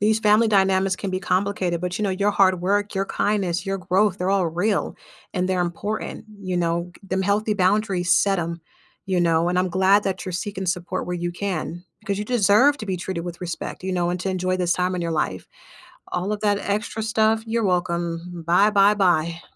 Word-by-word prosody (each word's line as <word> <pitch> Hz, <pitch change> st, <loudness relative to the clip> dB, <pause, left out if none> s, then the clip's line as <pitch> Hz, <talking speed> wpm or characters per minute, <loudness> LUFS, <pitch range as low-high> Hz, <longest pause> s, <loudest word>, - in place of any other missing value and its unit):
These 215 Hz, +2 st, +2 dB
family 215 Hz, +1 st, +4 dB
dynamics 190 Hz, -2 st, +2 dB
can 195 Hz, -, -4 dB
be 185 Hz, -, -1 dB
complicated, 185 Hz, -2 st, -1 dB
but 180 Hz, +2 st, -3 dB
you -, -, -2 dB
know, 200 Hz, -, +1 dB
your 200 Hz, +2 st, +1 dB
hard 190 Hz, -3 st, +3 dB
work, 205 Hz, +3 st, 0 dB
your 195 Hz, 0 st, -1 dB
kindness, 195 Hz, -5 st, -1 dB
your 195 Hz, 0 st, -2 dB
growth, 190 Hz, +2 st, +1 dB
they're 180 Hz, +1 st, 0 dB
all 195 Hz, -3 st, +2 dB
real, 180 Hz, +6 st, -1 dB, 0.4 s
and 185 Hz, -1 st, -1 dB
they're 185 Hz, -1 st, +1 dB
important, 205 Hz, +6 st, -4 dB
you 185 Hz, -2 st, -3 dB
know, 170 Hz, +1 st, -1 dB
g -, -, -18 dB
them 190 Hz, +1 st, 0 dB
healthy 210 Hz, +2 st, +1 dB
boundaries, 190 Hz, -2 st, +1 dB
set 195 Hz, -1 st, +3 dB
'em, 170 Hz, 0 st, -3 dB, 0.5 s
you 185 Hz, -2 st, 0 dB
know, 165 Hz, 0 st, +2 dB
and, 180 Hz, -, 0 dB
I'm 185 Hz, 0 st, +1 dB
glad 190 Hz, +3 st, +4 dB
that 190 Hz, -1 st, -2 dB
you're 185 Hz, -, -5 dB
seeking 190 Hz, +1 st, -4 dB
support 180 Hz, +1 st, -2 dB
where 180 Hz, -, -3 dB
you 175 Hz, 0 st, -3 dB
can, 175 Hz, -2 st, -4 dB, 0.2 s
because 200 Hz, -2 st, -3 dB
you 210 Hz, -, -2 dB
deserve 245 Hz, +4 st, +4 dB
to 215 Hz, -, -6 dB
be 190 Hz, -2 st, -1 dB
treated 175 Hz, -2 st, -4 dB
with 175 Hz, 0 st, -7 dB
respect, 175 Hz, 0 st, -5 dB
you 185 Hz, 0 st, -2 dB
know, 175 Hz, -1 st, 0 dB
and 180 Hz, 0 st, -3 dB
to 190 Hz, -, -2 dB
enjoy 185 Hz, 0 st, -1 dB
this 180 Hz, -1 st, +1 dB
time 180 Hz, 0 st, 0 dB
in 180 Hz, -, -2 dB
your 170 Hz, -1 st, -2 dB
life. 150 Hz, -, -2 dB, 0.6 s
All 185 Hz, +4 st, -2 dB
of 210 Hz, -, -2 dB
that 205 Hz, -1 st, +2 dB
extra 215 Hz, +2 st, -2 dB
stuff? 220 Hz, 0 st, +2 dB
You're 230 Hz, -1 st, 0 dB
welcome. 175 Hz, -1 st, -2 dB
Bye, 190 Hz, +5 st, +5 dB
bye, 205 Hz, 0 st, +5 dB
bye. 170 Hz, -4 st, +1 dB
185 Hz, 215 wpm, -23 LUFS, 175-205 Hz, 0.6 s, Bye